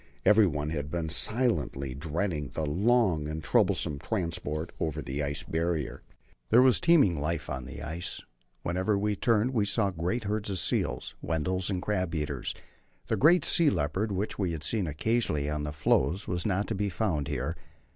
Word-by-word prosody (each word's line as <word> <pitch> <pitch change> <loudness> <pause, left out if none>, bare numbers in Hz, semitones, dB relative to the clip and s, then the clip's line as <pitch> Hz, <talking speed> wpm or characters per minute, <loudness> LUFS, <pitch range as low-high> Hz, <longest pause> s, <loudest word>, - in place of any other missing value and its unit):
Everyone 80 -9 +4
had 75 -2 -3
been 80 0 -2
silently 80 - +1
dreading 75 +1 -2
the 80 - -1
long 95 -1 +2
and 80 +1 -5
troublesome 70 - +2
transport 85 -1 -3
over 80 -2 -2
the 70 0 -3
Ice 70 0 -2
Barrier. 80 -2 -2 0.5
There 125 +2 +7
was 130 -2 +5
teeming 140 - +4
life 75 -1 -2
on 65 -2 -4
the 70 +3 -8
ice. 80 +3 -4 0.4
Wherever 95 +4 0
we 105 +1 0
turned 115 +3 +2
we 110 -4 +2
saw 100 0 +1
great 90 +8 -2
herds 105 0 -2
of 95 - -2
seals - - -1
Weddells 90 +4 -1
and 95 -3 -2
crab 90 -5 -1
eaters. 75 -2 -3 0.5
The - - +2
great 170 +5 +5
sea 165 -4 +4
leopard, 95 - -1
which 100 +3 -3
we 90 -4 0
had 80 -2 -5
seen 105 -6 0
occasionally 75 -1 0
on 75 0 -2
the 75 - -3
floes, 75 +5 +1
was 90 +3 -1
not 100 +1 0
to - - 0
be 100 0 -1
found 90 -8 -1
here. 70 +7 -2
85 Hz, 175 wpm, -29 LUFS, 75-105 Hz, 0.5 s, There